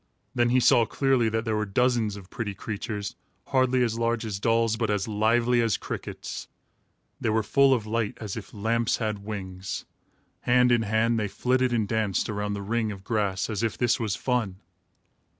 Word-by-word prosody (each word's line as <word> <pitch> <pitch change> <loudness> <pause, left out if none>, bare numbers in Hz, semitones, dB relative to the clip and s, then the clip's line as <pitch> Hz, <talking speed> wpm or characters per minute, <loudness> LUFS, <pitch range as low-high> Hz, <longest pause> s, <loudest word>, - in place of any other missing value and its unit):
Then 120 -1 +2
he 130 +1 +4
saw 120 -2 +5
clearly 135 -5 +2
that 110 +1 -1
there 110 -2 0
were 105 - 0
dozens 115 0 +1
of 100 -2 -12
pretty 105 -4 -4
creatures, 105 0 -5 0.3
hardly 130 -1 +3
as 115 -1 -1
large 115 0 0
as 100 -3 -3
dolls, 115 +1 +2
but 110 -1 -1
as 105 -1 0
lively 115 +3 +2
as 115 -3 +1
crickets. - - -6 0.7
They - - 0
were 110 +1 +2
as - - -10
full 140 +3 +4
of 120 -5 +2
light, 110 -1 -2
as 105 -4 -5
if 115 - -8
lamps 115 +2 0
had 105 -3 -3
wings. 95 -3 -5 0.5
Hand 125 0 +4
in 120 -1 +4
hand, 110 +2 +1
they 105 - 0
flitted 125 +5 +1
and 110 -3 +1
danced 110 -2 0
around 105 0 -2
the 100 - -5
ring 110 +1 -1
of 95 -2 -9
grass, 100 -4 0
as 105 -3 -3
if 115 -1 -1
this 120 +1 +2
was 110 -4 -1
fun. 120 -7 -1
110 Hz, 190 wpm, -26 LUFS, 105-120 Hz, 0.7 s, saw